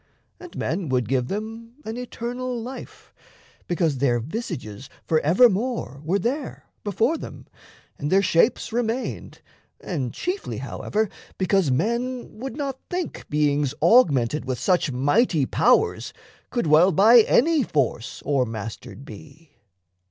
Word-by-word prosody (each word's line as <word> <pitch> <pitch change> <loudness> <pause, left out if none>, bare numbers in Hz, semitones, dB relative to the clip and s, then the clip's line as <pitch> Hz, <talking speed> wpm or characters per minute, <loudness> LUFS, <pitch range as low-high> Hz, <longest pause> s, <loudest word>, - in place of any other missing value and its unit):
And 360 -1 -12
men 170 -1 -2
would 125 -4 0
give 125 0 0
them 225 - -6
an 220 - -4
eternal 245 0 -4
life, 250 +4 -9 0.5
Because 165 -6 0
their 120 -3 +2
visages 130 - -6
forevermore 185 - +2
Were 175 +6 +1
there 260 +7 -3 0.2
before 225 - 0
them, - - -9 0.5
and 145 +1 -3
their 195 +1 +4
shapes 220 +7 +2
remained, 240 +1 -3 0.4
And 135 -10 -3
chiefly, 370 +3 -4
however, 215 +1 -2 0.3
because 190 -4 +2
men 235 - -2
would 265 +1 -6
not 275 -3 -3
think 360 -1 -4
Beings 145 -2 +1
augmented 150 - +4
with 130 -1 -2
such 175 - +1
mighty 145 - +2
powers 250 - +2 0.4
Could 240 - -1
well 160 +5 +5
by 220 +8 +7
any 300 +7 +4
force 140 - -2
o'ermastered 120 -1 -3
be. 155 0 -13
190 Hz, 120 wpm, -24 LUFS, -, 0.5 s, by